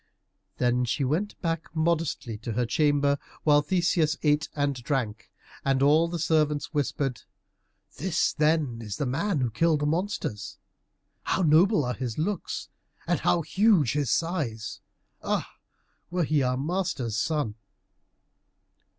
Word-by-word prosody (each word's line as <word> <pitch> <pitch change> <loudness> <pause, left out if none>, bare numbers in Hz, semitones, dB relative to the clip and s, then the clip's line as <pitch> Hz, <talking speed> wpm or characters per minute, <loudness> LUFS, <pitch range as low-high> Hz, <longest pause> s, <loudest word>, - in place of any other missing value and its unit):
Then 125 0 +2
she 125 +3 -1
went 165 +11 -1
back 165 -1 -2
modestly 160 -7 0
to 115 0 -5
her 120 +3 0
chamber, 145 +2 +2 0.2
while 145 -1 +5
Theseus 170 -1 +1
ate 150 0 +2
and 145 -1 +1
drank, 120 -4 -3 0.3
and 135 0 +2
all 155 +4 +5
the 170 +1 -3
servants 150 -2 +1
whispered, 140 -3 -1 0.8
"This, 170 +2 0
then, 150 -6 +1
is 105 -3 -5
the 145 - -1
man 150 +5 0
who 125 -2 0
killed 155 +5 +2
the - - +1
monsters! 150 - -2 0.6
How 190 - 0
noble 160 - +4
are 125 - -1
his 120 0 -4
looks, 185 +4 -2 0.4
and - - +1
how 170 - +2
huge 195 - +3
his 145 -4 0
size! 145 - -2 0.4
Ah, - - -1 0.6
would 175 -3 -1
he 155 -1 +3
were 130 - +2
our 125 0 0
master's 150 - -2
son!" 145 -1 0
150 Hz, 140 wpm, -27 LUFS, 125-165 Hz, 0.8 s, while